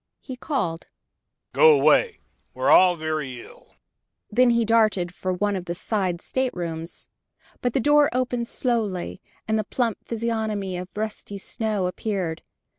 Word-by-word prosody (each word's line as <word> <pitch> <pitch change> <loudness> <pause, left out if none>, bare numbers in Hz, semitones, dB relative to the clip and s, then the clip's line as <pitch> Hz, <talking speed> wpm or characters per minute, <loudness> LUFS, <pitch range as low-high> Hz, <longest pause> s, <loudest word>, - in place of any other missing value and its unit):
He 260 - -8
called: 245 - -3 0.7
"Go 475 -1 +7
away 465 -3 +3 0.3
we're - - +2
all 185 -1 +7
very 155 -6 -3
ill!" - - -15 0.6
Then 250 +3 +4
he 235 -1 +3
darted 215 -6 +2
for 185 0 -3
one 200 +3 0
of 180 -2 -4
the 170 0 -3
side 185 -3 -1
staterooms. 175 -10 -3 0.5
But 245 -2 0
the - - +2
door 295 +2 +5
opened 245 -2 -1
slowly, 215 -8 -2 0.3
and 220 0 +1
the - - 0
plump 230 0 -1
physiognomy 220 -4 -2
of 180 +1 -6
Rusty 210 -1 -4
Snow 210 -1 -2
appeared. 180 -3 -3
210 Hz, 140 wpm, -24 LUFS, 180-235 Hz, 0.7 s, Go